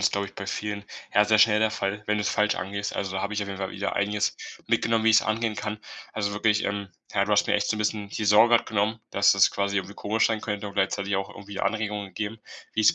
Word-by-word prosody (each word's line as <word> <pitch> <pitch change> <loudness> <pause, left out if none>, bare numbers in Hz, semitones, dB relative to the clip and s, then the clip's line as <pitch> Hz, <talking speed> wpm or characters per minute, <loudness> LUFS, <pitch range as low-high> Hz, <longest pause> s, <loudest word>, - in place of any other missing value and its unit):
ist, - - +2
glaube 100 0 -1
ich, - - -14
bei 100 +1 -6
vielen, 105 0 -4 0.3
ja, 105 +1 +6
sehr 110 0 +3
schnell 105 -1 +6
der 110 0 +2
Fall, 100 0 -3
wenn 105 0 +1
du's 105 - 0
falsch 105 0 +2
angehst. 100 +1 -4
Also, 95 -1 -3
da 95 - -2
habe 100 +1 -3
ich 105 - -1
auf 100 - -6
jeden 100 -1 -6
Fall 95 -1 -3
wieder 100 - -3
einiges 105 +1 0 0.3
mitgenommen, 115 -1 +2
wie 115 - +6
ich's 110 - +6
angehen 110 0 -1
kann. 105 0 -4 0.3
Also, 100 -1 -2
wirklich, 105 0 +2
ähm, 100 -1 -2 0.3
ja, 100 -1 +3
du 105 - -1
hast 105 - +4
mir - - +1
echt 105 0 +1
so 110 - 0
'n - - -5
bisschen 105 -1 -1
die 110 +1 -4
Sorge 110 +4 +6
grad - - -3
genommen, 110 +1 0
dass 100 0 +4
das 100 0 +5
quasi 100 0 -1
irgendwie 95 +1 -3
komisch 110 +2 +1
sein 110 -1 -1
könnte 105 -1 -4
und 100 - -11
gleichzeitig 100 +1 0
auch 95 0 -3
irgendwie 100 0 -8
Anregungen 105 -2 -2
gegeben, 105 +3 -5 0.3
wie - - 0
ich's 105 - +5
105 Hz, 270 wpm, -26 LUFS, 100-110 Hz, 0.3 s, ja